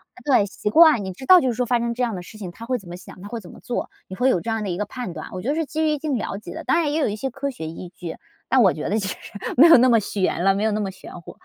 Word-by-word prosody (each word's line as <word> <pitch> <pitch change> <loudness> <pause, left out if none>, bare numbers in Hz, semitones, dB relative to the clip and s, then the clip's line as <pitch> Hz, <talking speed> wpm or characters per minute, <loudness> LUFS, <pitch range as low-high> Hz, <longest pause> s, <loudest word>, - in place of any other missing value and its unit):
啊， - - -15
对， 250 -8 +4
习 210 +1 -4
惯， 310 -4 +6
你 190 - -5
知 265 - -10
道 365 +3 +8
就 260 - 0
是 240 - +1
说 250 +2 -1
发 240 0 +1
生 235 0 -1
这 250 +1 -2
样 230 -3 -1
的 180 - -5
事 215 +4 -13
情， 185 -4 -7
她 230 +6 -10
会 255 0 -1
怎 185 -5 -13
么 175 - -7
想， 185 - -13
她 205 - -9
会 235 - -5
怎 180 - -13
么 - - -13
做。 245 - -3 0.2
你 190 - -6
会 260 +1 +3
有 180 -9 +1
这 230 - -5
样 220 -1 -2
的 195 - -3
一 175 - -2
个 210 - -2
判 245 -5 -6
断， 155 - -8
我 185 - -6
觉 240 - -6
得 290 - +1
是 325 -1 -1
基 315 +2 -3
于 310 - +2
一 300 - 0
定 285 -3 -2
了 210 - -4
解 190 -4 -9
的， - - -7
当 330 - +2
然 295 -2 0
也 315 - 0
有 290 - +2
一 210 - -2
些 265 +5 -3
科 275 +3 -4
学 160 -10 -7
依 170 +2 -8
据， 170 -3 -7 0.3
但 260 - +4
我 190 - +5
觉 155 - -4
得 215 +2 +1
其 195 - -3
实 - - -4 0.4
没 305 +7 +8
有 330 - +9
那 255 +2 +5
么 230 -2 +5
玄 190 -3 -1
了， 195 0 +4
没 200 +2 -2
有 220 - +2
那 210 - -1
么 195 -1 -3
玄 180 -2 -12
乎。 - - -12
220 Hz, 400 characters per minute, -22 LUFS, 190-260 Hz, 0.4 s, 有